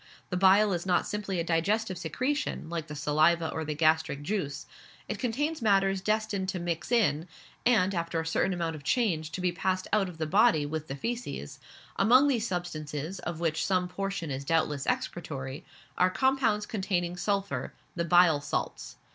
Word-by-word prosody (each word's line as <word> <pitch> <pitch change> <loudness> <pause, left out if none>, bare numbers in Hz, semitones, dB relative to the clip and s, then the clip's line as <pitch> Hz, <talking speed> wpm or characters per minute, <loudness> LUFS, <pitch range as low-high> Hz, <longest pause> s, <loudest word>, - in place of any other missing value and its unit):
The - - 0
bile 195 +2 +5
is 175 -1 -2
not 180 -2 +2
simply 205 -3 -3
a - - 0
digestive 185 +5 0
secretion, 250 - -2
like 165 -2 -3
the 150 - -7
saliva 155 +3 +2
or 160 - -3
the 150 -1 -3
gastric 155 -2 +2
juice; 150 -6 -3 0.4
it 215 - -4
contains 290 +6 -1
matters 195 -3 +3
destined 215 -2 -1
to 190 -2 -2
mix 170 +4 -3
in, 185 -9 +2 0.4
and 200 -6 +3
after 170 -1 -1
a 160 - -3
certain 160 +3 +1
amount 170 -3 -2
of 145 - -10
change 165 - 0
to 185 - -3
be 180 -1 +1
passed 185 +1 -1
out 200 -3 +3
of 170 - -11
the 160 - -1
body 195 -2 +4
with, 155 +1 -4
the 135 - -4
faeces; 145 - -5 0.4
among 250 +8 +6
these 235 -5 +1
substances, 160 -2 -4
of 170 -2 -5
which 165 -2 0
some 185 -2 +1
portion 195 -3 -4
is 135 +1 -3
doubtless 150 -2 0
excretory, 135 -5 -3 0.4
are 180 - +5
compounds 260 -2 +1
containing 185 -5 -1
sulphur 195 +2 -2 0.2
the 170 - 0
bile 170 -3 +5
salts. - - -4
180 Hz, 175 wpm, -29 LUFS, 160-205 Hz, 0.4 s, among